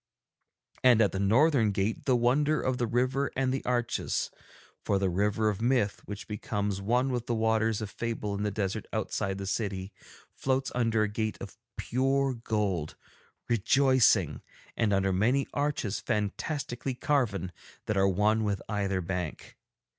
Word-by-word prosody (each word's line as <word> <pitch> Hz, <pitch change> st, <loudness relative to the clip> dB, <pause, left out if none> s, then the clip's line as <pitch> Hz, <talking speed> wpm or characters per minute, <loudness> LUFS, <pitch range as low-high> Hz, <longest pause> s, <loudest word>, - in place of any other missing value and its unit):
And 125 Hz, -3 st, +6 dB
at 105 Hz, -3 st, +4 dB
the 95 Hz, -, -3 dB
northern 115 Hz, +4 st, +4 dB
gate 100 Hz, +2 st, -1 dB
the 130 Hz, -, +3 dB
wonder 145 Hz, +6 st, +2 dB
of 130 Hz, -1 st, -1 dB
the 120 Hz, -, +1 dB
river 130 Hz, +4 st, 0 dB
and 130 Hz, -1 st, +1 dB
the 135 Hz, -, -2 dB
arches, 120 Hz, -1 st, -1 dB, 0.5 s
for 100 Hz, -, +1 dB
the 95 Hz, -2 st, 0 dB
River 105 Hz, +4 st, +1 dB
of 105 Hz, 0 st, -3 dB
Myth, 120 Hz, -4 st, +1 dB
which 105 Hz, 0 st, -7 dB
becomes 105 Hz, -2 st, -2 dB
one 125 Hz, +6 st, +1 dB
with 120 Hz, -2 st, -3 dB
the 120 Hz, -, 0 dB
Waters 110 Hz, -1 st, +1 dB
of 105 Hz, -, -5 dB
Fable 115 Hz, -3 st, -3 dB
in 100 Hz, -, -3 dB
the 105 Hz, -, 0 dB
desert 100 Hz, +1 st, -3 dB
outside 100 Hz, -2 st, -2 dB
the 100 Hz, -, -5 dB
city, 95 Hz, -1 st, -3 dB, 0.4 s
floats 135 Hz, 0 st, -1 dB
under 115 Hz, -3 st, +2 dB
a -, -, +1 dB
gate 110 Hz, +1 st, -2 dB
of -, -, -8 dB, 0.2 s
pure 135 Hz, +2 st, +1 dB
gold, 105 Hz, -9 st, -2 dB, 0.5 s
rejoicing, 130 Hz, +3 st, +3 dB, 0.3 s
and 110 Hz, -3 st, +1 dB
under 95 Hz, -1 st, +2 dB
many 125 Hz, +9 st, +2 dB
arches 145 Hz, -8 st, -1 dB
fantastically 120 Hz, +4 st, -2 dB
carven 120 Hz, -, 0 dB, 0.3 s
that 105 Hz, -, -1 dB
are 95 Hz, 0 st, +4 dB
one 105 Hz, +4 st, +2 dB
with 100 Hz, -2 st, 0 dB
either 100 Hz, -3 st, -1 dB
bank. 90 Hz, -2 st, -5 dB
110 Hz, 155 wpm, -29 LUFS, 100-125 Hz, 0.5 s, And